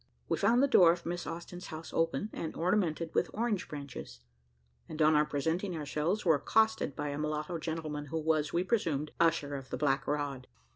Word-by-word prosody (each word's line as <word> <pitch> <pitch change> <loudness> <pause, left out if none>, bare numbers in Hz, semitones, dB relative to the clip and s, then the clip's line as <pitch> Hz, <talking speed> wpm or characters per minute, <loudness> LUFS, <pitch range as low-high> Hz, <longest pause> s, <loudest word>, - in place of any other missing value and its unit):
We - - +1
found 240 +3 +3
the - - +5
door 180 -10 +7
of 170 0 -4
Miss 175 +1 -3
Austin's 175 +2 -7
house 160 0 -8
open, 165 +6 0
and 160 - -4
ornamented 170 -2 0
with - - +1
orange 220 -3 -1
branches, 140 - -8 0.7
and 155 - -7
on 155 0 +5
our 150 0 +4
presenting 165 +6 -1
ourselves 155 +7 -1
were 165 - +6
accosted 220 -3 +2
by 145 0 -3
a 145 +1 -4
mulatto 155 +2 -2
gentleman, 155 -2 -4
who 160 +4 -3
was, 155 -1 +1
we 175 - +1
presumed, 165 -9 0
"usher 165 -4 +2
of 135 -1 -6
the - - -3
black 135 -2 +1
rod." 145 -3 -2
160 Hz, 190 wpm, -31 LUFS, 150-175 Hz, 0.7 s, door